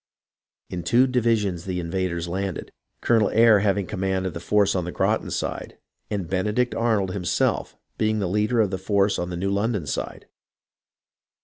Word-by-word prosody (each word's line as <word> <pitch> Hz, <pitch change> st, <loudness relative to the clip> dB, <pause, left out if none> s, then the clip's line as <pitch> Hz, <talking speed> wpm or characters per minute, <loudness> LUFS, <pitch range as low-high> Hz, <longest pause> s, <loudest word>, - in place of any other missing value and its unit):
In 90 Hz, -, -3 dB
two 120 Hz, +10 st, +4 dB
divisions 115 Hz, -8 st, 0 dB
the 90 Hz, -2 st, -2 dB
invaders 85 Hz, 0 st, -2 dB
landed. 95 Hz, 0 st, -4 dB, 0.3 s
Colonel 115 Hz, -3 st, +3 dB
Eyre 115 Hz, -2 st, +5 dB
having 100 Hz, -1 st, +1 dB
com 90 Hz, -, -6 dB
mand 95 Hz, 0 st, 0 dB
of 95 Hz, -, -3 dB
the 85 Hz, -, -5 dB
force 100 Hz, +3 st, +2 dB
on 90 Hz, -, -1 dB
the 90 Hz, -, -5 dB
Groton -, -, 0 dB
side, -, -, -4 dB, 0.3 s
and 100 Hz, -5 st, -3 dB
Benedict 105 Hz, +7 st, 0 dB
Arnold 110 Hz, -5 st, +1 dB
himself 90 Hz, -2 st, -1 dB, 0.2 s
being 110 Hz, 0 st, +1 dB
the 100 Hz, -, -1 dB
leader 105 Hz, +5 st, +1 dB
of 100 Hz, -3 st, +1 dB
the 95 Hz, -, -3 dB
force 100 Hz, +1 st, +1 dB
on 90 Hz, -, -3 dB
the 90 Hz, -, -4 dB
New 95 Hz, +2 st, -1 dB
London 100 Hz, -3 st, 0 dB
side. 70 Hz, -, -4 dB
100 Hz, 175 wpm, -24 LUFS, 90-105 Hz, 0.3 s, Eyre